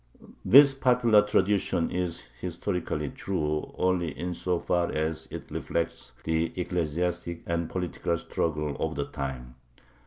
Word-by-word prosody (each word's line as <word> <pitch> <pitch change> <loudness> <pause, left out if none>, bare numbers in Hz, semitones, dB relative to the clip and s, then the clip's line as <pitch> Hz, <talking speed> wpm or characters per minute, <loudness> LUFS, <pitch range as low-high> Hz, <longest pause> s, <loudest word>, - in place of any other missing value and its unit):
This 140 +7 +8
popular 125 -5 +4
tradition 100 -4 +1
is 90 -2 -2 0.2
historically 90 -4 -2
true 75 -5 -2
only 90 -2 +1
insofar 90 0 -1
as 80 +1 -2
it - - -8
reflects 85 -6 -3
the 80 +1 0
ecclesiastic 85 0 -2
and 85 -1 -1
political 85 -2 -2
struggle 75 -3 -2
of 80 0 -1
the 70 0 -1
time. 65 -3 -6
85 Hz, 115 wpm, -28 LUFS, 80-90 Hz, 0.2 s, This